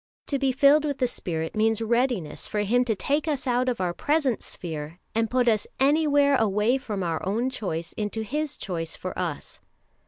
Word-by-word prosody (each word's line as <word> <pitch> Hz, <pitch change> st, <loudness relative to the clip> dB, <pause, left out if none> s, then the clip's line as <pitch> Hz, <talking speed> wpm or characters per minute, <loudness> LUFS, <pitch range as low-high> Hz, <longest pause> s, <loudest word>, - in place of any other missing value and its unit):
To 280 Hz, -, -1 dB
be 270 Hz, -1 st, +2 dB
filled 280 Hz, +3 st, +5 dB
with 285 Hz, -3 st, -1 dB
the 255 Hz, -, +2 dB
Spirit 160 Hz, -8 st, -4 dB
means 220 Hz, 0 st, +2 dB
readiness 230 Hz, -, 0 dB
for 210 Hz, -, -1 dB
Him 240 Hz, +5 st, +3 dB
to 225 Hz, -3 st, 0 dB
take 290 Hz, -, 0 dB
us 290 Hz, -4 st, -1 dB
out 250 Hz, 0 st, +2 dB
of 245 Hz, -, -2 dB
our 180 Hz, -2 st, 0 dB
present 290 Hz, -, +1 dB
sphere 160 Hz, -1 st, -6 dB, 0.2 s
and 225 Hz, 0 st, +1 dB
put 250 Hz, -1 st, +2 dB
us 215 Hz, -3 st, +2 dB
anywhere 285 Hz, 0 st, +4 dB
away 220 Hz, +4 st, +2 dB
from 210 Hz, -7 st, -4 dB
our 165 Hz, -2 st, -2 dB
own 230 Hz, +7 st, 0 dB
choice 170 Hz, -9 st, -4 dB
into 215 Hz, +1 st, -3 dB
His 295 Hz, +6 st, -3 dB
choice 165 Hz, -4 st, -4 dB
for 185 Hz, -, -5 dB
us." 170 Hz, -5 st, -4 dB
230 Hz, 190 wpm, -26 LUFS, 190-270 Hz, 0.2 s, filled